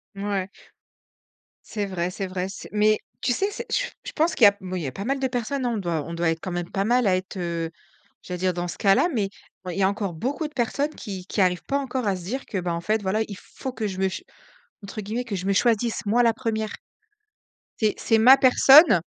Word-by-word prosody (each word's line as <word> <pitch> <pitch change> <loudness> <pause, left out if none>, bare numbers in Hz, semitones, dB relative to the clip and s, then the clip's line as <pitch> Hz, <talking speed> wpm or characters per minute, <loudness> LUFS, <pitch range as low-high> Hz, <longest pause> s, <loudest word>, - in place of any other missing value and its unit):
Mouais. 195 -1 -2 1.2
C'est 210 -2 -3
vrai, 180 -3 -2
c'est 195 +1 -4
vrai, 185 0 -3
c'est 190 - -9
mais 215 +1 +3 0.2
tu 245 - +1
sais, 395 - 0
c'est - - -6
j - - 0
je - - -6
pense 320 +3 +1
qu'il 230 - +6
y - - +12
a 200 - +4
moui 185 -1 -4
il - - -5
y 140 - -2
a - - -4
pas 200 - -6
mal 275 +1 0
de 265 - +1
personnes, 250 +2 -2
hein. 240 - 0
On - - -2
doit 170 -6 -2
on 165 - -6
doit 170 0 0
être 165 0 -1
quand 185 - -5
même 175 -1 -3
pas 195 0 0
mal 245 +1 +3
à 185 - +4
être, 185 +1 -5
heu, 170 -2 -2 0.5
j'allais 180 0 -5
dire, 185 0 +1
dans 175 0 -3
ce - - -6
cas-là, 195 - +4
mais, 205 -5 0 0.4
ouais, 180 -2 -4
il - - -3
y - - +3
a 190 - +4
encore 200 -2 -3
beaucoup 270 - -2
de 300 - -17
personnes 280 +5 -1
qui 190 -5 -7
qui 205 - -1
arrivent 180 -1 +2
pas 280 - 0
encore 260 -4 -3
à 195 - +2
se 180 - -8
dire 255 +10 -4
que, 200 - -4
ben, 175 -1 -2
en 170 - -3
fait 215 +4 0
voilà 200 +3 0
il 200 - -8
faut 260 +6 -8
que 220 -4 -2
je 190 -2 -5
me 190 0 +2
ch 185 - -7 0.6
entre 200 +2 -6
guillemets 225 +5 -3
«que 220 -5 -4
je 185 0 -4
me 200 - +3
choisisse 230 0 +1
moi 230 +4 +3
la 230 -1 +4
1re». 220 -3 -2 1.1
C'est 215 -2 +2
c'est 225 - +2
ma 250 +4 +8
personne. 270 - +7
205 Hz, 260 wpm, -24 LUFS, 185-240 Hz, 1.2 s, y